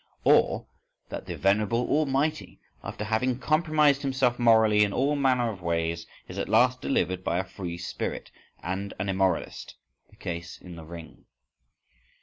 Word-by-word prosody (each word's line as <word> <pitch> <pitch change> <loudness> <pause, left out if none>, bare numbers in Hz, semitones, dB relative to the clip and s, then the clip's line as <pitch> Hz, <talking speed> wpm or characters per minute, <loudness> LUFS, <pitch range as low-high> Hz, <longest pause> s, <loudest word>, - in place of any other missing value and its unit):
Or - - +4 0.4
that - - -7
the - - -5
venerable 105 +5 +1
Almighty, 150 0 0 0.2
after - - -5
having 110 +4 0
compromised 155 -1 +2
himself 130 -3 +1
morally 110 -3 +5
in 100 -1 0
all 140 +3 +1
manner 130 -4 +2
of 95 -4 -10
ways, 85 -1 -1 0.2
is - - -7
at - - -3
last 125 +1 +4
delivered 95 -7 0
by 85 - 0
a 95 - 0
free 90 -2 -6
spirit 85 - -5 0.3
and 95 +3 -4
an 95 +1 -3
immoralist? 95 -2 -1 0.3
(the - - -21
case 85 0 -6
in 90 -1 -11
the 80 -1 -10
"Ring"). 85 0 -11
105 Hz, 150 wpm, -27 LUFS, 90-130 Hz, 0.4 s, morally